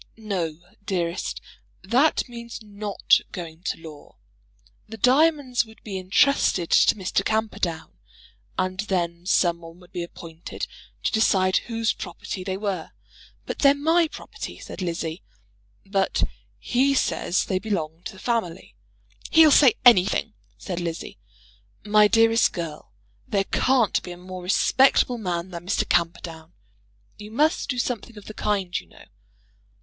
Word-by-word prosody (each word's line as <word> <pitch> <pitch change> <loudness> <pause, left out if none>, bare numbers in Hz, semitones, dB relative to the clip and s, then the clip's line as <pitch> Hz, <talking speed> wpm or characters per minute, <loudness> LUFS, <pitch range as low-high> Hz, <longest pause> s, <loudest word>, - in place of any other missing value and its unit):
"No, 185 -8 -3 0.3
dearest, 175 -3 -2 0.4
that 255 +11 +2
means 235 -1 -8
not 205 -1 +1
going 165 -2 -7
to - - -1
law. 155 -3 -12 0.7
The 225 - -8
diamonds 265 +1 +3
would 220 -1 -17
be 195 -3 -4
entrusted 185 -2 +2
to - - +5
Mr. 195 0 -1
Camperdown. 205 -7 -2 0.6
And 185 0 -1
then 175 -4 -2
some 170 -3 +3
one 165 +1 -12
would 180 -1 -18
be 175 - -4
appointed 165 -1 -7 0.4
to - - +1
decide 190 -4 +3
whose 230 -1 0
property 185 +1 -7
they 190 0 -3
were." 195 -5 -4 0.5
"They're 280 0 +3
my 325 +4 +3
property," - - -8
said - - -9
Lizzie. 165 -1 -3 0.6
"But 195 -1 0 0.3
he 270 +3 +1
says 185 -7 +1
they 185 - -1
belong 170 -6 -3
to - - -5
the - - -14
family." 195 -6 -2 0.6
"He'll 320 -2 +7
say 275 -5 +6
anything," 215 -1 +5 0.2
said 180 -3 -5
Lizzie. 170 - -5 0.7
"My 210 0 +5
dearest 225 +1 +4
girl, 160 - -6 0.4
there 200 -1 +1
can't 250 -7 +2
be - - -9
a - - -12
more 185 +1 -8
respectable 245 +6 +3
man 180 -2 -3
than 170 0 -8
Mr. 200 - 0
Camperdown. 165 -1 -1 0.7
You 210 0 -9
must 300 +9 +1
do 250 - -1
something 235 -2 -3
of 205 - -11
the 215 - -8
kind, 195 -4 -1
you - - -16
know." - - -17
195 Hz, 140 wpm, -24 LUFS, 175-230 Hz, 0.7 s, He'll